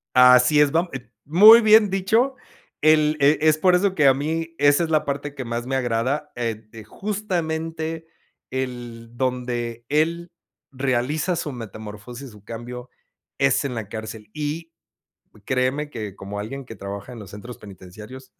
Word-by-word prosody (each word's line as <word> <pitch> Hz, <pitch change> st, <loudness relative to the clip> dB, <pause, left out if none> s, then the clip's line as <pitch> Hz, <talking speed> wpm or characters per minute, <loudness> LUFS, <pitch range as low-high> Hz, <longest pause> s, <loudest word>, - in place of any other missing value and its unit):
Así 125 Hz, +3 st, +6 dB
es, 145 Hz, -1 st, +3 dB
vam 165 Hz, +4 st, +1 dB
eh 125 Hz, -3 st, -8 dB, 0.2 s
¡muy 210 Hz, +10 st, +8 dB
bien 215 Hz, -1 st, +6 dB
dicho! 220 Hz, +8 st, +1 dB, 0.5 s
El 155 Hz, 0 st, +4 dB
e 140 Hz, +2 st, +4 dB
es 155 Hz, 0 st, +4 dB
por 180 Hz, +3 st, +4 dB
eso 190 Hz, +1 st, +1 dB
que 150 Hz, -5 st, +4 dB
a 135 Hz, -, +7 dB
mí, 160 Hz, +4 st, -3 dB
esa 145 Hz, +3 st, +4 dB
es 165 Hz, -, -3 dB
la 155 Hz, -1 st, +2 dB
parte 140 Hz, 0 st, -4 dB
que 135 Hz, -, -5 dB
más 120 Hz, +1 st, -4 dB
me 135 Hz, -, -1 dB
agrada, 130 Hz, +4 st, -1 dB
ed 115 Hz, -2 st, -4 dB
eh, 110 Hz, -1 st, -10 dB
justamente 165 Hz, -, -4 dB, 0.4 s
el 120 Hz, -3 st, -5 dB
donde 120 Hz, -2 st, -3 dB
él 165 Hz, +4 st, 0 dB, 0.4 s
realiza 135 Hz, +6 st, -1 dB
su 155 Hz, -3 st, -3 dB
metamorfosis 115 Hz, +2 st, -9 dB
y -, -, -15 dB
su 105 Hz, -2 st, -17 dB
cambio 120 Hz, +3 st, -8 dB, 0.5 s
es -, -, +2 dB
en 130 Hz, -3 st, -3 dB
la 110 Hz, -3 st, -5 dB
cárcel 110 Hz, -1 st, -8 dB
y, 155 Hz, +2 st, -4 dB, 0.7 s
créeme 130 Hz, +3 st, 0 dB
que 105 Hz, -7 st, -7 dB
como 100 Hz, +1 st, -7 dB
alguien 130 Hz, +6 st, -6 dB
que 115 Hz, -, -10 dB
trabaja 100 Hz, +3 st, -7 dB
en 120 Hz, -, -9 dB
los 105 Hz, -4 st, -10 dB
centros 115 Hz, +4 st, -9 dB
penitenciarios 105 Hz, +6 st, -12 dB
130 Hz, 165 wpm, -23 LUFS, 115-160 Hz, 0.7 s, muy